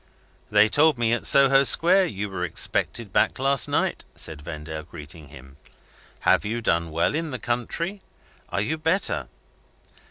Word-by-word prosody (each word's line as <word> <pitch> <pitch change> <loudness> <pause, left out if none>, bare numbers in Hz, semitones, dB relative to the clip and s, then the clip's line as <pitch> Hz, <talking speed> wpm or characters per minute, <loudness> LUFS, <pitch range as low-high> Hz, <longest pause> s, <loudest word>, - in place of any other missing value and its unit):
"They 105 0 +5
told 150 +4 +3
me 115 -1 +1
at 120 - 0
Soho 135 0 +5
Square 180 +6 +4
you 105 - -4
were 95 -2 -5
expected 95 +4 -2
back - - +2
last 135 -1 +2
night," - - -1
said 80 -2 -5
Vendale, 75 0 -7
greeting 75 0 -12
him. 70 -1 -15 0.6
"Have - - +3
you 110 +3 -3
done 85 -7 -1
well 85 - 0
in 160 +1 -3
the 130 - -5
country? 165 - -3 0.5
Are 95 - -2
you 155 +10 -2
better?" 165 +5 0
115 Hz, 155 wpm, -24 LUFS, 85-140 Hz, 0.6 s, They